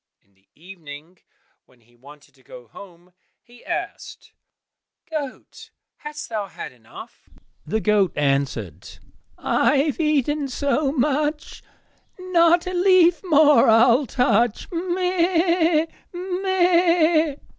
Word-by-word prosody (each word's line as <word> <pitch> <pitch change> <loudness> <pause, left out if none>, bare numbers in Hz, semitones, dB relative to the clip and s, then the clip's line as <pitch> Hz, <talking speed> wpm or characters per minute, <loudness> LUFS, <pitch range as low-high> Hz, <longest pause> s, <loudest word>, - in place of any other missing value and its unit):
In 100 - -38
the 95 0 -37
evening 165 -1 -13 0.5
when 125 -2 -27
he 120 +1 -29
wanted 145 +4 -18
to 135 - -26
go 125 -2 -14
home, 180 - -15 0.3
he 240 0 -20
asked, - - -7 0.7
"Goat, 300 -5 -8 0.3
hast 300 0 -8
thou 215 -3 -4
had - - -9
enough?" 120 -3 -15 0.4
The 220 +7 -2
goat 205 -4 +2
answered, 135 - -3 0.4
"I 295 - +1
have 290 +3 -1
eaten 295 -2 0
so 280 +2 -1
much, 295 +2 -2 0.6
Not 345 -2 +2
a 365 - -5
leaf 360 -1 +3
more 300 -8 +4
I'll 235 +4 +4
touch, 235 -2 0
meh! 345 -2 0
260 Hz, 105 wpm, -21 LUFS, -, 0.7 s, more